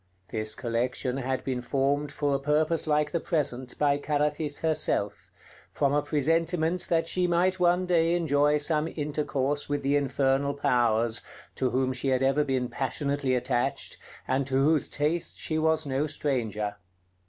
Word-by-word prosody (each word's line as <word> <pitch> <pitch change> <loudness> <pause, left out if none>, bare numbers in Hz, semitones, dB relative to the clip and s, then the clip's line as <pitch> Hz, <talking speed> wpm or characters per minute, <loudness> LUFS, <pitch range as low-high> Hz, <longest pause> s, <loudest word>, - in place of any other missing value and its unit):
This 110 -1 -2
collection 125 +2 -2
had 130 0 -2
been 130 -2 -2
formed 140 +3 0
for 145 -1 -1
a 140 - +1
purpose 155 +3 +1
like 150 0 +1
the 170 - 0
present 130 -7 -2
by 145 -1 +2
Carathis 150 0 0
herself, 160 -1 0 0.4
from 140 -1 +1
a 145 - +3
presentiment 165 +4 0
that 165 -1 +2
she 180 +2 0
might 180 +2 +2
one 180 +1 +3
day 170 -1 +2
enjoy 150 -3 +2
some 150 +1 0
intercourse 145 -2 -2
with 145 -1 -1
the 140 +1 +2
infernal 140 0 +1
powers, 120 -4 +1 0.3
to 130 - 0
whom 130 +1 0
she 130 +2 -2
had 130 0 +2
ever 135 +3 +3
been 130 -3 -1
passionately 140 +1 -1
attached, 125 0 -1 0.3
and 135 0 0
to 135 - -2
whose 155 -1 +2
taste 155 +4 -1
she 155 -1 -2
was 160 0 +1
no 140 +2 -1
stranger. 115 -8 -2
145 Hz, 155 wpm, -27 LUFS, 130-155 Hz, 0.4 s, a